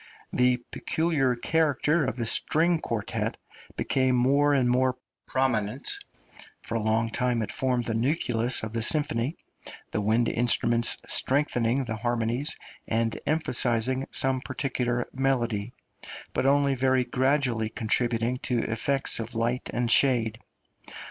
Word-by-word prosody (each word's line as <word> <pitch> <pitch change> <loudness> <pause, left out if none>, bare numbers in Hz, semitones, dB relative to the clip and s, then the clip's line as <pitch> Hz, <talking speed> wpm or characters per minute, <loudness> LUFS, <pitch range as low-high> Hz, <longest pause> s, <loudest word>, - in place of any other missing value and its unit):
The 125 0 +3
peculiar 150 -6 0
character 150 +3 +1
of 130 - -2
the 120 -2 -3
string 165 +8 +2
quartet 115 -8 -3 0.4
became 130 -1 +1
more 140 +4 +3
and 135 -3 +2
more 130 +1 +2 0.3
prominent; 125 -2 +2 0.7
for - - -4
a 115 - 0
long 110 +1 +1
time 120 -1 0
it - - -5
formed 125 -2 0
the 115 - -2
nucleus 120 -1 0
of 110 0 -5
the 115 - -1
symphony, 140 +1 0 0.5
the - - -1
wind 110 +3 +2
instruments 120 -1 +2
strengthening 130 -2 +1
the 110 -2 -4
harmonies 120 +5 -1 0.3
and 115 0 0
emphasising 130 -4 +1
some 130 -1 0
particular 125 -3 -2
melody, 120 -5 -1 0.6
but 130 - 0
only 140 0 +3
very 130 0 +2
gradually 125 -4 0
contributing 120 +2 0
to 120 -3 -1
effects 135 +5 -1
of 115 +1 -6
light 120 +2 -1
and 120 -1 -1
shade. 120 -5 +3
125 Hz, 130 wpm, -26 LUFS, 115-135 Hz, 0.7 s, The